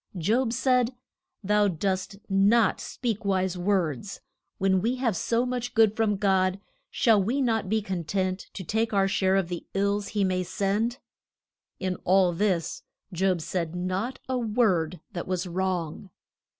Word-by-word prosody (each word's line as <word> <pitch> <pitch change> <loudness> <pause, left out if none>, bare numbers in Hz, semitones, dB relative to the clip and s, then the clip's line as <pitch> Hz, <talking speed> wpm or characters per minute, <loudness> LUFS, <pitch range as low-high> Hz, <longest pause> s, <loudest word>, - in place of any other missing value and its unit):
Job 225 +8 +1
said, 250 0 +2 0.5
Thou 210 +1 +3
dost 190 +2 -2
not 200 +3 +3
speak 230 -5 -3
wise 190 -2 0
words. 180 -2 -1 0.4
When 190 -1 +2
we 235 +5 0
have 245 -6 0
so 230 +7 +1
much 245 -1 -3
good 220 -2 +5
from 220 -3 +1
God, 190 -1 +2 0.3
shall 220 -4 +3
we 235 +9 0
not 225 -7 0
be 220 0 +1
con 185 -5 -3
tent 185 +2 -2
to 190 - -5
take 220 +5 -1
our 195 -1 +3
share 190 0 +2
of 195 -3 +1
the 175 -1 -6
ills 200 +1 +1
he 205 -2 0
may 185 -1 +1
send? 205 +6 -1 0.8
In 185 -1 -2
all 185 -1 +3
this 180 -2 0 0.3
Job 185 -1 +1
said 170 0 -3
not 185 +8 -2
a 260 -1 -1
word 200 -8 +1
that 175 -4 -5
was 185 0 -1
wrong. 180 -1 -3
195 Hz, 155 wpm, -27 LUFS, 185-220 Hz, 0.8 s, good